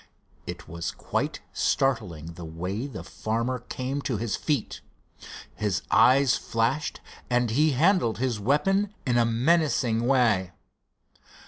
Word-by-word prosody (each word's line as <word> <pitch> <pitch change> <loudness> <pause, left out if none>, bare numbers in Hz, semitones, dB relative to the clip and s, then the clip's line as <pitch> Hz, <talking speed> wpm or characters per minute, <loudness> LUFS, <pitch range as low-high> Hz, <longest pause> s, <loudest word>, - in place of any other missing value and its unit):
It 85 -2 -7
was 85 +1 -4
quite - - -3
startling 90 - 0
the 85 - -9
way 90 - -4
the 135 - -8
farmer 115 +3 -2
came 130 +3 -4
to 125 -5 -2
his 110 0 -2
feet. 145 -8 -2 0.7
His 105 -2 -1
eyes 135 0 +5
flashed 120 +6 -1 0.3
and 120 -2 +1
he 150 +5 +3
handled 155 - +3
his 125 -3 -1
weapon 195 - +1
in 120 -2 +2
a 120 - +4
menacing 120 -2 +2
way. 110 -9 +2
120 Hz, 125 wpm, -26 LUFS, 105-135 Hz, 0.7 s, eyes